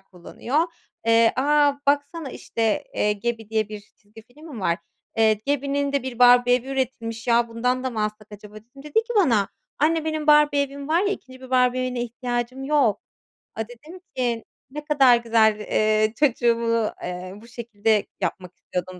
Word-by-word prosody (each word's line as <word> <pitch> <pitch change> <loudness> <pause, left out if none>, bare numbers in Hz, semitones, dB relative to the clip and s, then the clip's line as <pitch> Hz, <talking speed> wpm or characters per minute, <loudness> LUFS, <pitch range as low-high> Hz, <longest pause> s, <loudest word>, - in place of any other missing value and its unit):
kullanıyor. 195 - -4 0.5
Eee, 230 0 +5
"A, 290 +2 +3
baksana, 285 +1 0
işte, 225 -3 -2
eee, 210 - +1
Gabby 230 +2 -3
diye 220 -1 0
bir 210 -1 -7 0.2
çizgi 215 +1 -17
film 280 +8 -17
mi 220 - -7
var? 170 -2 0 0.4
Eee, 220 -1 +4
Gabby'nin 280 0 -1
de 280 - 0
bir 255 -2 -6
Barbie 245 0 +6
evi 250 +1 -2
üretilmiş. 235 -4 -3
Ya, 235 0 +3
bundan 250 +3 -1
da 260 - -1
mı 220 -2 -2
alsak 215 0 -6
acaba?" 210 0 -12
dedim. 240 +6 -14
Dedi 300 -1 -11
ki 455 +2 +1
bana: 235 - +3 0.3
"Anne, 320 +2 +2
benim 310 -1 -3
Barbie 295 -1 +5
evim 280 +1 -7
var 330 +2 +3
ya. 400 - 0
2'nci 260 -10 -6
bir 260 - -12
Barbie 255 0 +3
evine 250 -1 -2
ihtiyacım 245 +2 -4
yok." 270 -9 +2 0.6
Aaa, 225 - -2
dedim 300 +10 -13 0.2
ki: 240 -3 -1 0.3
"Ne 300 +1 -7
kadar 270 -5 +5
güzel." 225 -2 +2
Eee, 215 +1 +1
çocuğumu, 230 -5 +1
eee, 180 +1 -6
bu 215 +3 -14
şekilde 225 -2 -1 0.2
yapmak 180 -1 -4
istiyordum 180 0 -6
240 Hz, 175 wpm, -23 LUFS, 220-280 Hz, 0.6 s, Barbie